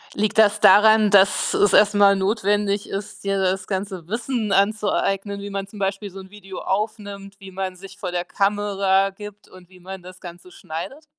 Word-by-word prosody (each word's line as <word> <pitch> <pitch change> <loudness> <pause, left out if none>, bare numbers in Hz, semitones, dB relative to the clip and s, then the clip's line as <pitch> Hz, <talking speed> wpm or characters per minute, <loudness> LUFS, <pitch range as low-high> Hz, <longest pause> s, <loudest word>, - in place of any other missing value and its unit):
Liegt 215 +1 0
das 210 -1 +4
daran, 215 +1 +6
dass 200 0 +3
es 205 -2 +3
erst 205 +1 +5
mal 200 -1 +5
notwendig 205 0 -1
ist, 195 0 -7
dir 195 0 -1
das 190 0 -1
ganze 190 -3 -5
Wissen 230 0 -3
anzueignen, 200 0 0
wie 200 0 -7
man 195 0 -4
zum 210 - -14
Beispiel 195 +1 -3
so 195 +1 -11
'n 190 +1 -13
Video 195 -3 -10
aufnimmt, 200 -1 -4
wie 195 -1 -12
man 190 0 -5
sich 190 +1 -13
vor 180 - -5
der 175 0 -3
Kamera 195 -1 0
gibt 205 +1 -12
und 185 -1 -17
wie 185 - -18
man 190 +1 -9
das 185 +1 -13
Ganze 175 +1 -12
schneidet? 175 - -8
195 Hz, 190 wpm, -21 LUFS, 190-205 Hz, -, daran